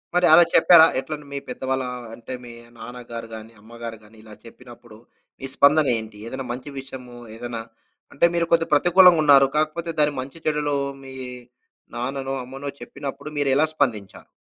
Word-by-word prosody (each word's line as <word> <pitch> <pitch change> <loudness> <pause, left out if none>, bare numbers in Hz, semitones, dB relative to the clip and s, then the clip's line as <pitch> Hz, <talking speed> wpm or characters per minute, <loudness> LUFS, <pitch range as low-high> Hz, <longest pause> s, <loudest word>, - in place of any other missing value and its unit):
మరి 180 0 +4
అలా 175 +2 +9
చెప్పారా? 170 -3 +8
ఎట్లంటే 150 +2 -6
మీ - - -3
పెద్దవాళ్ళ 130 0 -2 0.3
అంటే 120 +2 -9
మీ 120 - -10 0.3
నాన్నగారు 115 0 -8
గాని, 110 +1 -10
అమ్మగారు 115 +1 -9
గాని, 110 +1 -19
ఇలా 110 -1 -13
చెప్పినప్పుడు 120 -1 -14 0.4
మీ - - -6
స్పందన 150 +1 +5
ఏంటి? 110 -1 -10
ఏదైనా 130 +2 -6
మంచి 125 +4 -6
విషయము 130 -2 -10 0.2
ఏదైనా 120 0 -6 0.5
అంటే 155 - +3
మీరు 170 -1 +1
కొద్ది 165 -1 +4
ప్రతికూలంగా 175 +2 +6
ఉన్నారు. 140 -2 +7
కాకపోతే 155 +2 -1
దాని 150 -1 +3
మంచి, 135 +4 -10
చెడులు 150 -1 0 0.3
మీ 135 0 -10 0.8
నాన్ననో, 135 +2 -3
అమ్మనో 135 +3 -7
చెప్పినప్పుడు 140 +1 -7
మీరు 145 -1 +1
ఎలా 150 +3 +4
స్పందించారు? 115 -10 -2
135 Hz, 155 wpm, -23 LUFS, 120-150 Hz, 0.8 s, అలా